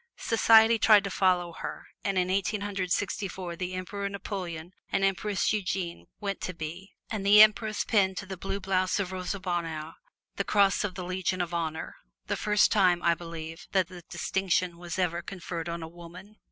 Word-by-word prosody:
Society 225 0 +5
tried 210 -2 +6
to 200 - -4
follow 180 -3 +2
her, - - -7 0.2
and 195 -2 -1
in 180 0 +1
Eighteen 200 +2 0
Hundred 195 -3 -3
Sixty 205 +1 0
four 180 -2 -6
the 185 +1 -4
Emperor 200 +2 -4
Napoleon 180 -4 -5 0.2
and 195 - +1
Empress 195 +2 +1
Eugenie 190 -4 -3
went 200 -2 -3
to 185 - -4
By, 170 +4 -6 0.2
and 215 -3 -2
the 205 +1 +7
Empress 215 0 +2
pinned 190 -4 +2
to 205 - -4
the 190 0 -6
blue 195 +2 -4
blouse 185 0 0
of 190 -2 -2
Rosa 185 +1 -3
Bonheur 165 -4 -3 0.4
the - - +1
Cross 200 -1 +3
of 195 -3 -3
the 180 -1 -5
Legion 185 0 -1
of 175 -1 -2
Honor, 160 -2 -3 0.3
the - - -1
first 210 0 +3
time, 180 -4 +3
I 170 - +4
believe, 165 -1 -8
that 190 -2 +2
the 180 -2 -10
distinction 180 -1 -1
was 175 0 -5
ever 175 -2 0
conferred 175 -2 -6
on 170 0 -4
a - - -6
woman. 175 +5 -12
185 Hz, 190 wpm, -28 LUFS, 175-200 Hz, 0.4 s, the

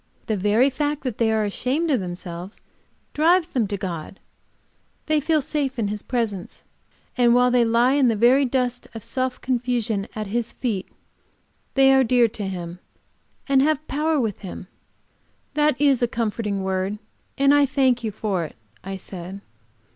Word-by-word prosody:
The 220 - -1
very 210 +7 +3
fact 295 +2 -2
that 250 -5 -4
they 225 -1 +3
are 220 -1 +1
ashamed 260 +10 0
of 260 - +2
themselves 175 +1 -7 0.5
drives 335 +3 +3
them 240 -9 0
to 200 0 -3
God; 180 -1 -6 0.9
they 310 -1 +2
feel 310 0 +1
safe 275 -2 -2
in 215 -3 0
His 210 0 -3
presence, 220 -7 -3 0.5
and 240 -1 +4
while 250 0 +4
they 245 -1 +4
lie 235 +3 +3
in 280 -2 +4
the 230 - +2
very 245 +6 +5
dust 250 -1 -1
of 225 - -7
self 255 -1 -2
confusion 240 -5 -1
at 215 -1 -3
His 235 +3 -2
feet 215 -7 -3 0.9
they 270 0 +6
are 265 0 +5
dear 245 -1 +4
to 210 -2 -5
Him 175 -2 -6 0.7
and 275 -1 +4
have 310 +1 +1
power 305 +2 0
with 220 -6 -2
Him." 190 -2 -8 0.9
"That 295 -2 +2
is 280 -4 +3
a 240 - +3
comforting 215 -3 -2
word, 190 +2 -1 0.4
and 275 +1 +4
I 290 -1 +5
thank 260 -3 +2
you 220 - -2
for 200 -4 -2
it," 155 - -8 0.3
I 195 +1 -5
said. 190 0 -8
240 Hz, 170 wpm, -23 LUFS, 205-270 Hz, 0.9 s, they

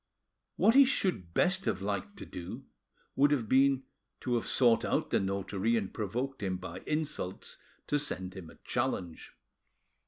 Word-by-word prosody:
What 225 - +5
he 275 +2 +9
should 185 - 0
best 185 +1 +3
have 95 - 0
liked 100 0 -3
to - - -7
do, 90 -1 -8 0.5
would 145 +2 +5
have 135 -7 +1
been 135 +2 +4 0.4
to 125 - -1
have 120 - 0
sought 120 -3 +4
out - - 0
the - - +3
notary 100 +3 0
and 100 -4 -3
provoked 120 +6 -3
him 95 -2 -1
by 90 0 -7
insults 150 - -3 0.3
to 145 - +1
send 95 -10 -2
him 95 -4 -8
a - - -14
challenge. 85 -4 -2
110 Hz, 160 wpm, -31 LUFS, 95-140 Hz, 0.5 s, he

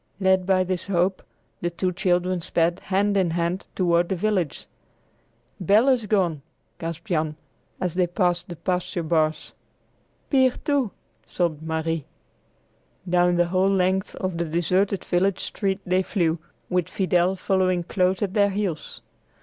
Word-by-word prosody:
Led 190 -1 +3
by 185 -1 +4
this 185 0 -3
hope, 185 0 +1 0.4
the 175 - 0
two 180 +2 -1
children 180 -1 0
sped, 170 0 +1
hand 200 +1 0
in 190 -3 +2
hand, 170 +3 -2
toward 175 -2 +2
the 190 - 0
village. 185 -4 -1 0.9
"Bel 210 +8 +4
is 245 -5 +2
gone!" 180 -8 +1 0.4
gasped 165 0 -5
Jan, 155 -6 -1 0.4
as 180 -3 -1
they 180 -1 +2
passed 175 -1 0
the 175 - -5
pasture 180 0 -2
bars. 155 -1 0 0.8
"Pier, 260 -3 +4
too," 280 -6 +1 0.4
sobbed 170 -4 -1
Marie. 160 -1 -2 1.0
Down 175 0 +3
the 175 0 +3
whole 185 +2 +2
length 190 0 +1
of 185 -3 -3
the 170 - 0
deserted 180 +4 0
village 185 +1 +1
street 195 -2 -2
they 185 +1 +2
flew, 170 -4 0 0.3
with 180 -1 0
Fidel 185 -1 +1
following 185 -2 +1
close 185 +2 +1
at 195 -2 -2
their 205 -2 +4
heels. 190 -6 -4
180 Hz, 145 wpm, -24 LUFS, 170-190 Hz, 1.0 s, by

